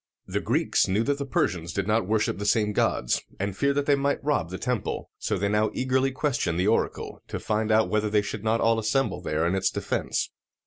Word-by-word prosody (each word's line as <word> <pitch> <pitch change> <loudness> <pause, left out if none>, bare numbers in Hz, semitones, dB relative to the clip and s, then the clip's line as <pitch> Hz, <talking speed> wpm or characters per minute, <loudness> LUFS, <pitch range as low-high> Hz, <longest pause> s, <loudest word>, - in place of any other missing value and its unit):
The - - -2
Greeks - - +1
knew 100 +4 +1
that 140 +3 0
the 140 - -3
Persians 85 -8 -1
did 100 +1 -1
not 110 -1 +1
worship 105 -3 0
the 100 - -3
same 105 0 +2
gods, 60 - +1 0.2
and 100 0 -2
feared 140 +6 +1
that 145 0 +1
they 145 - +4
might 140 0 0
rob 145 - 0
the 95 - -5
temple: 125 -2 -3
so - - -1
they 100 - 0
now 105 +1 +2
eagerly 130 +1 +1
questioned 125 - -1
the 90 - +2
oracle, - - -1
to - - -4
find 110 +1 -1
out 110 0 +4
whether 105 0 0
they 105 0 +2
should 105 0 -5
not 110 +1 +1
all 115 0 +3
assemble 110 -3 0
there 80 -1 -1
in 85 - +1
its 95 -1 +2
defense. - - -2
110 Hz, 225 wpm, -26 LUFS, 100-130 Hz, 0.2 s, they